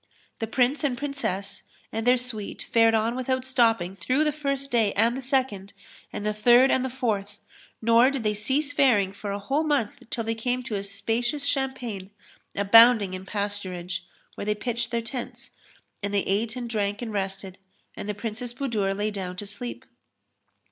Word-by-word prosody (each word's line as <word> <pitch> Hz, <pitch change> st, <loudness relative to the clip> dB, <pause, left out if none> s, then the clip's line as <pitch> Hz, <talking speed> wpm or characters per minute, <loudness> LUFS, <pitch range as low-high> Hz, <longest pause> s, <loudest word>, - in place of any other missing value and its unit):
The 225 Hz, -, -2 dB
Prince 255 Hz, +6 st, +1 dB
and 265 Hz, -4 st, 0 dB
Princess 270 Hz, -9 st, -3 dB, 0.3 s
and 225 Hz, +2 st, -3 dB
their 250 Hz, +1 st, +6 dB
suite 240 Hz, -4 st, -5 dB
fared 225 Hz, -1 st, +4 dB
on 225 Hz, +2 st, +1 dB
without 255 Hz, 0 st, -1 dB
stopping 225 Hz, -8 st, +2 dB
through 255 Hz, -, +1 dB
the 305 Hz, -, +2 dB
first 275 Hz, -2 st, -3 dB
day 225 Hz, -4 st, +3 dB
and 230 Hz, +4 st, +3 dB
the 265 Hz, -, -4 dB
second 250 Hz, -7 st, -1 dB, 0.4 s
and 205 Hz, -, -5 dB
the 210 Hz, -, +1 dB
third 240 Hz, +5 st, +6 dB
and 260 Hz, -, +2 dB
the 260 Hz, -, -1 dB
fourth, 210 Hz, -6 st, -2 dB, 0.4 s
nor 230 Hz, +3 st, +6 dB
did 275 Hz, -4 st, -3 dB
they 210 Hz, -1 st, +1 dB
cease 270 Hz, +8 st, 0 dB
faring 220 Hz, -9 st, +4 dB
for 200 Hz, 0 st, -5 dB
a 200 Hz, -, -2 dB
whole 270 Hz, +10 st, 0 dB
month 285 Hz, -9 st, +1 dB, 0.2 s
till 230 Hz, -, -2 dB
they 225 Hz, 0 st, -1 dB
came 245 Hz, +3 st, -2 dB
to 240 Hz, -3 st, -6 dB
a 200 Hz, -, -1 dB
spacious 230 Hz, +8 st, -2 dB
champaign, 255 Hz, -9 st, -2 dB, 0.5 s
abounding 215 Hz, 0 st, +6 dB
in 185 Hz, +1 st, -7 dB
pasturage, 190 Hz, -4 st, -3 dB, 0.3 s
where -, -, -6 dB
they 210 Hz, 0 st, +1 dB
pitched 235 Hz, +2 st, -2 dB
their 235 Hz, -1 st, -1 dB
tents; 245 Hz, +1 st, -6 dB, 0.5 s
and 200 Hz, 0 st, -2 dB
they 200 Hz, -1 st, +2 dB
ate 220 Hz, +4 st, 0 dB
and 245 Hz, -1 st, -4 dB
drank 205 Hz, -1 st, -1 dB
and 225 Hz, -2 st, -5 dB
rested, 195 Hz, -1 st, -4 dB, 0.4 s
and 205 Hz, -, -6 dB
the 210 Hz, -, -2 dB
Princess 230 Hz, +3 st, -5 dB
Budur 215 Hz, -8 st, -1 dB
lay 210 Hz, +1 st, 0 dB
down 185 Hz, -3 st, -5 dB
to 205 Hz, -, -6 dB
sleep. 205 Hz, +5 st, -7 dB
225 Hz, 180 wpm, -26 LUFS, 200-255 Hz, 0.5 s, their